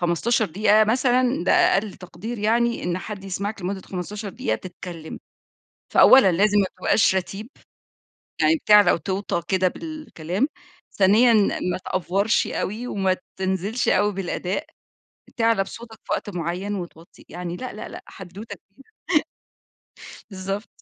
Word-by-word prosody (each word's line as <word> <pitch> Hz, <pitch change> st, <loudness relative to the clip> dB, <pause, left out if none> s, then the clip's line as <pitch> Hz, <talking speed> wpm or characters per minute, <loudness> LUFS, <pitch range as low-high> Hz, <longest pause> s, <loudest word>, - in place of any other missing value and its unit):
15 180 Hz, +7 st, +1 dB
دقيقة 210 Hz, +4 st, +4 dB
مثلًا، 250 Hz, -2 st, +2 dB
ده -, -, +3 dB
أقل 200 Hz, 0 st, +3 dB
تقدير 190 Hz, +6 st, -8 dB
يعني 235 Hz, +3 st, +1 dB
إن 175 Hz, +1 st, -1 dB
حد 200 Hz, 0 st, -7 dB
يسمعك 200 Hz, +1 st, -4 dB
لمدة 190 Hz, +2 st, -3 dB
15 200 Hz, +3 st, -6 dB
دقيقة 110 Hz, -, -2 dB
تتكلِّم، 175 Hz, -1 st, -9 dB, 0.8 s
فأوّلًا 255 Hz, -9 st, +7 dB
لازم 205 Hz, +4 st, +3 dB
ما 195 Hz, -, +2 dB
تبقاش 205 Hz, -, +3 dB
رَتيب. 195 Hz, +4 st, -4 dB, 0.9 s
يعني 325 Hz, -, +4 dB
بتعلى 210 Hz, -, +6 dB
وتوطَى 190 Hz, +1 st, -2 dB
كده 185 Hz, -1 st, +2 dB
بالكلام، 280 Hz, -, -4 dB, 0.5 s
ثانيًا 215 Hz, +5 st, +5 dB, 0.4 s
ما -, -, -3 dB
تأڤورشِ 195 Hz, +4 st, +1 dB
أوي، 220 Hz, +5 st, -3 dB
وما 190 Hz, -5 st, 0 dB, 0.2 s
تنزلش 190 Hz, +5 st, -1 dB
أوي 205 Hz, +2 st, +3 dB
بالأداء، 185 Hz, 0 st, -3 dB, 0.7 s
تعلَى 225 Hz, -4 st, +3 dB
بصوتك 225 Hz, +2 st, -10 dB
في -, -, -4 dB
وقت -, -, -2 dB
مُعين، 180 Hz, +3 st, -3 dB
وتوطي 170 Hz, -3 st, -9 dB
يعني 175 Hz, 0 st, -6 dB
لا، 255 Hz, +4 st, -6 dB
لا، 215 Hz, -, -8 dB
لا -, -, -10 dB
حدوتة 190 Hz, +4 st, -10 dB
كبيرة 195 Hz, +6 st, -29 dB, 1.5 s
بالضبط. 195 Hz, +2 st, -4 dB
195 Hz, 130 wpm, -23 LUFS, 185-220 Hz, 1.5 s, فأوّلًا